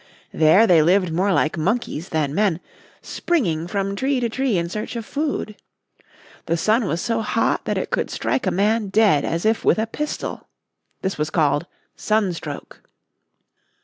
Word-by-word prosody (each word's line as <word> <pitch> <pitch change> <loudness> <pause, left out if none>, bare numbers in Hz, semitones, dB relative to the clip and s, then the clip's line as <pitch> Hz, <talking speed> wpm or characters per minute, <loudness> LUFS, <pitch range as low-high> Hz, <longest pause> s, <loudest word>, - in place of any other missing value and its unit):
There 160 +8 +5
they 175 -7 +5
lived 180 +1 +2
more 190 +4 +1
like 160 -2 +1
monkeys 190 -2 -2
than 150 -3 -1
men, 190 -2 +1 0.4
springing 175 - -1
from 195 +1 -2
tree 265 +5 0
to 240 -1 -1
tree 260 -3 0
in 170 0 -1
search 210 +6 -5
of 230 -2 -4
food. 285 -7 -3 0.9
The 165 0 +1
sun 220 +7 +2
was 170 -2 -1
so 230 +4 -1
hot 225 +1 0
that - - -1
it - - -3
could - - -1
strike 255 - -1
a - - +4
man 205 +4 +1
dead 195 -8 +3
as 165 +3 -2
if 220 +1 +1
with - - +3
a 220 - +1
pistol. 295 +7 -5 0.6
This 190 -4 -2
was 150 0 0
called 155 0 +1 0.3
sunstroke. 180 -9 -2
195 Hz, 165 wpm, -22 LUFS, 165-225 Hz, 0.9 s, There